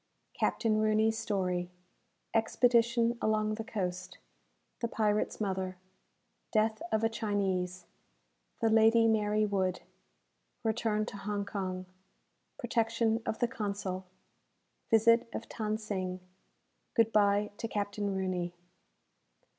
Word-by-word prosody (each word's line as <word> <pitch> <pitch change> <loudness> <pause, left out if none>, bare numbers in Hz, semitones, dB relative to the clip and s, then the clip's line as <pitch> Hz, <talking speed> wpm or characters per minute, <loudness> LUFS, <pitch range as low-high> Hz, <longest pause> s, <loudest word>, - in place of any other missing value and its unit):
Captain 220 -2 +1
Rooney's 215 +1 +3
story 185 -5 -1 0.6
Expedition 235 +1 +3
along 215 0 +1
the 225 +1 -4
Coast 185 -6 -4 0.6
The 235 - 0
Pirate's 215 -2 0
Mother 190 -3 -2 0.7
Death 220 0 +2
of 220 0 +1
a - - +5
Chinese 190 -5 -1 0.8
The 225 - +3
"Lady 225 +1 +6
Mary 215 -1 +2
Wood" 190 -3 0 0.8
Return 220 -1 0
to 200 - -7
Hong 205 0 -3
Kong 185 -2 -4 0.7
Protection 230 -1 +1
of 220 - -1
the 240 - +1
Consul 200 -4 -4 0.8
Visit 230 +1 +5
of - - -3
Than 215 -1 -2
Sing 185 -4 -3 0.8
Good 225 -1 +4
bye 205 0 +3
to 230 - -3
Captain 205 -1 -2
Rooney. 180 -2 -2
215 Hz, 105 wpm, -31 LUFS, 195-225 Hz, 0.8 s, Lady